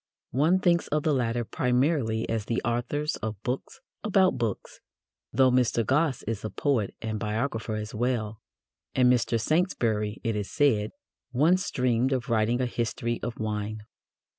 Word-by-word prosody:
One 155 +9 +3
thinks 175 -2 +2
of 150 0 0
the 155 - +2
latter 120 -2 0
primarily 125 -3 +1
as 110 -2 -2
the 115 - 0
authors 120 +6 -1
of 110 -3 -5
books 125 +2 -4 0.2
about 190 -3 +3
books, 115 -4 -3 0.5
though 130 +2 +4
Mr. 120 -2 +2
Gosse 135 0 +1
is 110 -1 -4
a 110 - -2
poet 125 -8 0
and 110 -1 -2
biographer 110 +1 -2
as 105 0 -5
well, 110 -2 -1 0.5
and 125 -1 +5
Mr. 115 -1 +1
Saintsbury, 115 - 0
it 115 -3 0
is 105 -1 -3
said, 115 -8 +2 0.4
once 170 +9 +3
dreamed 125 +1 +1
of 125 -3 -2
writing 115 +2 +2
a - - +2
history 120 0 -2
of 120 - -4
wine. 105 0 -3
120 Hz, 155 wpm, -27 LUFS, 110-135 Hz, 0.5 s, and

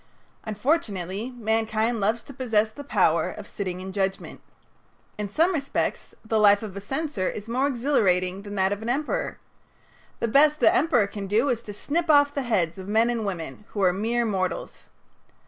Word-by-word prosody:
Unfortunately 210 - -1
mankind 225 0 0
loves 220 +4 0
to 275 - -11
possess 220 -4 +1
the 285 - -9
power 285 - +2
of - - -9
sitting 185 -4 -4
in 190 +1 -7
judgment. 195 -1 -3 0.8
In 205 -1 -3
some 330 - +2
respects 280 -4 -2
the 220 0 +1
life 205 0 +5
of 200 -3 -7
a 200 - -5
censor 270 - -2
is 210 +1 -7
more 255 +4 +1
exhilarating 195 -9 +1
than 205 0 -8
that 190 0 +2
of 205 - -6
an 225 - -4
emperor. 300 - -1 0.8
The - - 0
best 295 +6 +4
the 330 - +5
emperor 320 - +3
can 200 0 -6
do 225 +8 +2
is 235 -3 0
to 215 - -8
snip 320 +10 -2
off 285 -1 +5
the 280 - -1
heads 190 -9 0
of 190 - -8
men 225 +3 +3
and 225 -3 -2
women, 170 0 -5
who 205 - -1
are 180 -1 +4
mere 230 +5 0
mortals. 190 -4 -3
220 Hz, 180 wpm, -25 LUFS, 200-265 Hz, 0.8 s, life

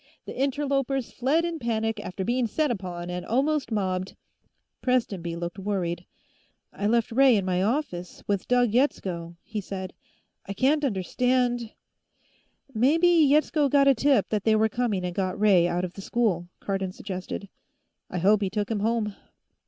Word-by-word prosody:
The - - -7
interlopers 275 -1 -1
fled 295 +7 +1
in 335 -1 -3
panic 225 -2 -1
after 190 +1 -5
being 245 +1 +1
set 300 +5 0
upon 180 -5 -5
and 180 0 -4
almost 275 +1 0
mobbed 190 -3 -2 0.3
" - - -51
Prestonby 200 -10 0
looked 170 +3 -5
worried. 180 -3 -2 0.7
"I 205 - -2
left 230 +1 +1
Ray 260 +1 +5
in 200 -3 0
my 180 -1 0
office, 200 -6 -2
with 200 -2 -1
Doug 245 -2 +3
Yetsko," 180 -9 -1
he 215 -1 -5
said. 190 -1 -6 0.5
"I 200 - -3
can't 285 +8 +2
understand 245 +1 0 0.5
" 270 - -34
"Maybe 330 +6 +5
Yetsko 300 -2 +4
got 275 0 +4
a 275 - +7
tip 265 -2 +2
that 210 -2 -1
they 220 -1 +4
were 220 0 +3
coming 215 -5 -1
and 180 - -3
got 185 0 -2
Ray 195 -5 +5
out 175 +1 -1
of 180 - -8
the 195 - -9
school," 195 -6 0
Cardon 195 -2 -2
suggested. 185 +1 -6 0.6
"I - - -4
hope 200 +4 +4
he 195 - 0
took 210 +2 -2
him 215 - 0
home." 215 -1 0
215 Hz, 170 wpm, -26 LUFS, 185-255 Hz, 0.7 s, a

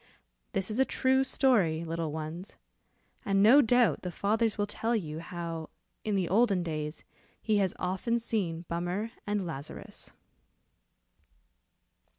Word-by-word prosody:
This 195 +2 -1
is 220 - -2
a - - +7
true 265 0 +2
story, 215 - +2
little 165 -1 -3
ones, 160 +4 -6 0.7
and 195 -1 +2
no 255 +7 +8
doubt 245 -2 +3
the 180 - -4
fathers 215 +5 0
will 205 - +1
tell 225 +3 -1
you, 160 -7 -3
how, 165 -2 -5 0.3
in 210 -2 0
the 185 -3 +1
olden 200 -1 +3
days, 155 -2 -4 0.4
he 215 -2 +1
has 195 -3 +1
often 190 +6 -1
seen 185 -8 -2
Bummer 175 +6 -2 0.2
and 205 -2 0
Lazarus. 145 -3 -7
195 Hz, 135 wpm, -30 LUFS, 165-225 Hz, 0.7 s, no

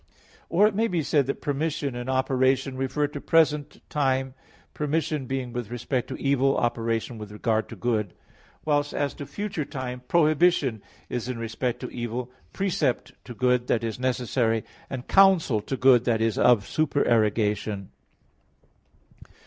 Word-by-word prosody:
Or 190 +5 +4
it 215 - +3
may 225 +3 +1
be 175 -6 -1
said 140 -2 +2
that 140 - -4
permission 145 -2 -1
and 120 +1 -5
operation 130 0 +1
refer 135 +3 0
to 145 0 -6
present 150 -3 +1
time, 135 -2 0 0.4
permission 150 -2 -1
being 130 -2 -3
with 120 -4 -4
respect 120 +1 -2
to - - -6
evil, 135 0 +2
operation 115 -1 -1
with 105 -1 -8
regard 110 +1 -1
to - - -8
good. 110 -6 -1 0.5
Whilst 145 -1 +1
as 145 -1 -1
to 145 - -8
future 190 +1 -3
time, 125 -2 -6
prohibition 155 - +3 0.3
is 125 0 -4
in 125 - -3
respect 115 +2 -3
to - - -5
evil, 120 +1 -4 0.2
precept 170 -9 -1
to 120 - -9
good 125 0 +1
that 115 - +1
is 115 0 -3
necessary 125 -3 0 0.3
and 130 -1 -6
counsel 185 - +5
to 130 +6 -4
good 125 -2 +5
that 115 -3 +2
is 115 -1 +1
of 120 -5 +4
supererogation. 110 -8 +1
130 Hz, 150 wpm, -26 LUFS, 120-145 Hz, 0.5 s, counsel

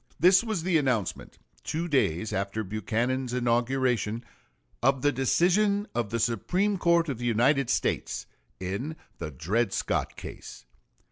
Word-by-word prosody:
This 185 +6 +6
was 215 -8 -2
the 175 -3 +3
announcement, 125 - -2 0.3
two 165 +2 -2
days 110 - +1
after 100 +3 -2
Buchanan's 120 +5 -1
inauguration, 120 -1 0 0.6
of 135 +1 +2
the 145 - +4
decision 185 - +2
of 120 -3 -1
the 115 - -1
Supreme 180 - 0
Court 170 -1 +3
of 135 -6 -3
the 120 - -4
United 125 +3 +3
States - - -1 0.3
in 100 +12 -3 0.2
the 80 - -4
Dred 95 - -1
Scott - - -1
case. - - -10
125 Hz, 135 wpm, -27 LUFS, 110-160 Hz, 0.6 s, This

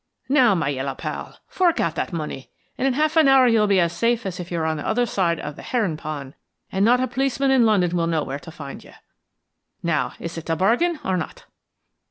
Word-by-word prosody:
Now, 255 -7 +5
my 165 -5 0
yellow 135 0 -3
pal, - - -6
fork 355 -3 +1
out 165 - +1
that 170 - -3
money, 150 -5 -5 0.3
and 265 - 0
in 265 - +2
half 305 +3 +1
an 315 -3 +6
hour 265 -2 +6
you'll 225 -3 +3
be 200 -2 +3
as 170 -1 +1
safe 230 +3 +1
as 185 -2 -4
if 180 0 -7
you 170 - -1
were 160 - -1
on 160 0 0
the 150 - -5
other 240 +2 +2
side 175 -7 0
of 150 - -6
the - - -10
herring 215 -10 -1
pond 150 -3 -6 0.4
and 190 +1 +1
not 245 +3 +5
a 255 - +1
policeman 270 +2 0
in 250 -4 +5
London 180 -5 +2
will 165 -1 +1
know 160 -3 0
where 140 +1 -5
to 165 - -12
find 140 -4 -9
you. - - -16 0.9
Now, 170 -3 0
is 170 0 -5
it 165 - -12
a 165 - +2
bargain 245 - +2
or 185 -1 +1
not?" 170 - -6
185 Hz, 240 wpm, -23 LUFS, 160-245 Hz, 0.9 s, an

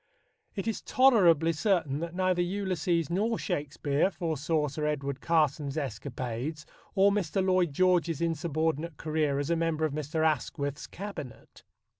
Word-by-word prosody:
It 200 +1 -3
is 225 - -2
tolerably 180 - +4
certain 160 -6 +1
that 170 +1 -5
neither 185 -1 +1
Ulysses 175 -3 -1
nor 215 +5 +1
Shakespeare 145 -1 0
foresaw 160 -3 -1
Sir 150 +2 -3
Edward 140 -2 -2
Carson's 150 -3 +1
escapades 130 +2 -4 0.3
or 195 +1 +5
Mr. 195 -2 0
Lloyd 185 -3 +2
George's 175 -1 +2
insurbordinate 160 -1 -1
career 155 -3 0
as 145 +3 -1
a - - +3
member 165 -1 0
of 150 - -2
Mr. 155 +2 -1
Asquith's 145 -2 -1
Cabinet. 190 - -9
160 Hz, 135 wpm, -29 LUFS, 145-180 Hz, 0.3 s, or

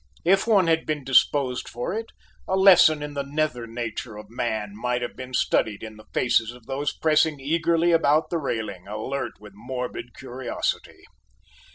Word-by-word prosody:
If 195 +5 +3
one 200 -5 +5
had 165 -1 +1
been 150 -2 -2
disposed 135 -1 +2
for 120 +8 -4
it, 225 +2 -3 0.4
a 190 - +1
lesson 180 -6 +6
in 150 0 -6
the 140 - -2
nether 140 -4 -2
nature 115 -1 -5
of 105 - -11
man 110 -4 -3
might 125 +2 -1
have 120 - -5
been 130 0 -6
studied 105 -3 +1
in 110 -1 -8
the 110 - -16
faces 120 -3 +2
of 125 -2 -16
those 140 +3 -2
pressing 155 -1 +2
eagerly 165 +4 +1
about 160 -2 +3
the 170 - 0
railing, 110 - -4
alert 115 +4 -4
with 105 -1 -13
morbid 125 +1 -6
curiosity. 130 0 -4
130 Hz, 170 wpm, -24 LUFS, 115-155 Hz, 0.4 s, lesson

